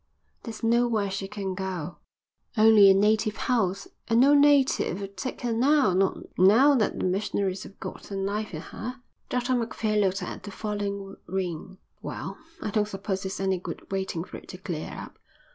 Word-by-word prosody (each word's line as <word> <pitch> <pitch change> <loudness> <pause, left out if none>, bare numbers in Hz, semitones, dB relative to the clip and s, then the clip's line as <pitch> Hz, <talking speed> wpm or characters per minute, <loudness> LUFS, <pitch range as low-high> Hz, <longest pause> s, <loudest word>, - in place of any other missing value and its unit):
"There's 230 -2 -8
nowhere 230 -3 +2
she 195 0 -3
can 195 -2 -4
go, 185 -3 -4 0.6
only 215 -2 +8
a - - +8
native 215 +2 +2
house, 195 -6 0 0.2
and 230 0 +3
no 275 +3 +6
native'll 280 -9 +3
take 200 +6 -6
her 240 -1 -1
now, 260 -2 +3
not 190 +1 +2 0.2
now 225 +10 +6
that 235 -6 +1
the - - -1
missionaries 190 0 -1
have 200 - -12
got - - -7
their 200 - -6
knife 205 +2 -2
in 155 - -5
her." 250 +8 -7 0.3
Dr 250 +1 0
Macphail 225 -3 0
looked 195 -1 0
at - - -6
the - - -8
falling 200 -1 -4
rain. 185 0 -4 0.2
"Well, - - -6 0.2
I 210 - -2
don't 210 0 +1
suppose 195 -1 -4
it's 190 - -5
any 190 -1 0
good 185 - -8
waiting 190 -4 -2
for - - -9
it - - -15
to 185 - -7
clear 175 -4 -5
up." - - -9
200 Hz, 180 wpm, -27 LUFS, 190-225 Hz, 0.6 s, only